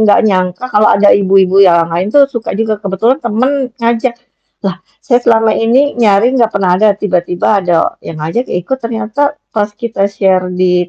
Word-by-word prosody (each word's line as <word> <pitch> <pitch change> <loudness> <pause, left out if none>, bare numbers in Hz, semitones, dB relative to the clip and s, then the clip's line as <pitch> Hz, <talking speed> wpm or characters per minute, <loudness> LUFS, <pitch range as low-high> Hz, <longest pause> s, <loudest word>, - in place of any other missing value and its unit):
gak 210 -2 +4
nyangka 185 +1 -1
kalau 210 +1 +4
ada 200 0 +4
ibu-ibu 195 -1 +3
yang 170 -3 +4
lain 180 +4 -1
tuh 280 +6 +4
suka 235 -7 -5
juga, 215 -1 -2
kebetulan 220 +7 -1
temen 255 +3 -1
ngajak, 235 +1 -1 0.5
lah 190 -1 -3 0.2
saya 245 -3 +2
selama 225 -2 +2
ini 255 +6 +1
nyari 215 +2 +3
gak 230 - +3
pernah 190 -3 0
ada 210 -2 +3
tiba-tiba 180 0 -1
ada 175 -3 -1
yang 165 - -9
ngajak 235 +11 -3
ikut 190 +10 -3
ternyata 235 +5 -2 0.2
pas 210 -2 -1
kita 210 -4 -2
share 190 -2 0
di 180 -1 0
210 Hz, 170 wpm, -12 LUFS, 185-235 Hz, 0.5 s, gak